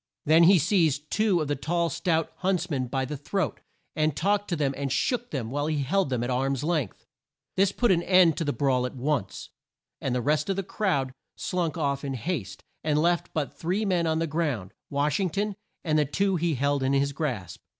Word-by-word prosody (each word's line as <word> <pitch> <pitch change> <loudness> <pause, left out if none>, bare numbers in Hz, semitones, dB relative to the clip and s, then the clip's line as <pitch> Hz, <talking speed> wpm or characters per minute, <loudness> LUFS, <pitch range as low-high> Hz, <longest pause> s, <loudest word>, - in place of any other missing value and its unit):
Then 160 +3 +6
he 190 +2 +7
seized 155 -4 +1
two 210 -6 +2
of 155 - -2
the 145 - 0
tall 170 +5 0
stout 170 -2 0
hunts 185 -2 0
men 130 -3 -1
by 130 +1 -1
the 150 +3 -5
throat, 155 +4 -2 0.4
and 155 -2 +1
talked 205 +3 +1
to 175 - -1
them 140 -3 0
and 140 -1 -3
shook 240 - 0
them 125 -6 -4
while 145 +2 -1
he 150 -3 0
held 190 +3 +1
them 125 -2 -1
at 120 - -2
arm's 135 +1 0
length. 155 - -2 0.5
This 195 0 +3
put 240 +1 +2
an 170 -2 +3
end 180 -3 +5
to - - 0
the 145 - 0
brawl 125 -1 +1
at 125 - -10
once, 130 -6 -2 0.5
and 130 -2 -1
the - - +1
rest 150 +4 +1
of 195 - +1
the 195 - -2
crowd 160 -10 -1 0.2
slunk 175 -2 -2
off 140 -3 -1
in 135 -1 -3
haste, 130 - -4 0.2
and 150 -1 +2
left 170 +2 +1
but 150 -3 -2
three 185 +6 0
men 175 -4 +1
on 160 0 +1
the 165 - 0
ground: 145 - -2 0.2
Wash 145 +2 0
ing 190 -2 +1
ton, 205 +4 -2 0.3
and 155 -2 +2
the 150 - +3
two 195 +7 0
he 170 -2 0
held 140 +2 +1
in 135 +1 +1
his 140 0 +2
grasp. 125 - -4
155 Hz, 220 wpm, -27 LUFS, 140-175 Hz, 0.5 s, he